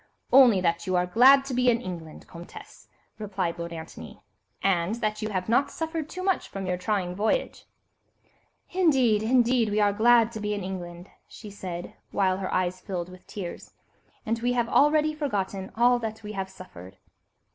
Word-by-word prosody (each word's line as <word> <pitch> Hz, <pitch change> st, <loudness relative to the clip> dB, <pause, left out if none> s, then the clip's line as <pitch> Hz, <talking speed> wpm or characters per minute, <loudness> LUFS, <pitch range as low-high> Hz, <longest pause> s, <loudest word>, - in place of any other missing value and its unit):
"Only 250 Hz, -7 st, +7 dB
that 170 Hz, +1 st, -1 dB
you 185 Hz, -, 0 dB
are 180 Hz, 0 st, +2 dB
glad 260 Hz, +9 st, +6 dB
to 275 Hz, -, -5 dB
be 250 Hz, 0 st, +3 dB
in 235 Hz, -1 st, +2 dB
England, 170 Hz, -8 st, -8 dB
Comtesse," 170 Hz, 0 st, -12 dB, 0.3 s
replied 190 Hz, -5 st, -3 dB
Lord 170 Hz, 0 st, -5 dB
Antony, 160 Hz, -1 st, -9 dB, 0.4 s
"and 190 Hz, +1 st, +1 dB
that 215 Hz, -2 st, -2 dB
you 215 Hz, -, -2 dB
have 185 Hz, -3 st, -3 dB
not 260 Hz, +5 st, +2 dB
suffered 320 Hz, -2 st, -4 dB
too 370 Hz, -, -6 dB
much 380 Hz, -1 st, 0 dB
from 195 Hz, -1 st, -6 dB
your 180 Hz, -1 st, -1 dB
trying 180 Hz, -1 st, -2 dB
voyage." 220 Hz, -, -1 dB, 1.1 s
"Indeed, 265 Hz, -, +3 dB
indeed, 240 Hz, 0 st, +2 dB
we 210 Hz, +1 st, 0 dB
are 205 Hz, -1 st, +3 dB
glad 230 Hz, +1 st, +4 dB
to 220 Hz, -, -6 dB
be 210 Hz, 0 st, -2 dB
in 200 Hz, -, -5 dB
England," 175 Hz, -1 st, -7 dB, 0.2 s
she 210 Hz, -2 st, -11 dB
said, 180 Hz, -3 st, -7 dB, 0.2 s
while 185 Hz, -2 st, +1 dB
her 190 Hz, -1 st, -4 dB
eyes 185 Hz, 0 st, -1 dB
filled 180 Hz, -2 st, -5 dB
with 185 Hz, 0 st, -15 dB
tears, 185 Hz, -4 st, -8 dB, 0.5 s
"and 225 Hz, +1 st, -1 dB
we 245 Hz, +1 st, 0 dB
have 240 Hz, -1 st, 0 dB
already 305 Hz, +1 st, +3 dB
forgotten 200 Hz, -10 st, -3 dB
all 245 Hz, +2 st, +4 dB
that 220 Hz, -1 st, -6 dB
we 210 Hz, -, -6 dB
have 195 Hz, -2 st, -4 dB
suffered." 95 Hz, -, -13 dB
210 Hz, 180 wpm, -26 LUFS, 185-240 Hz, 1.1 s, Only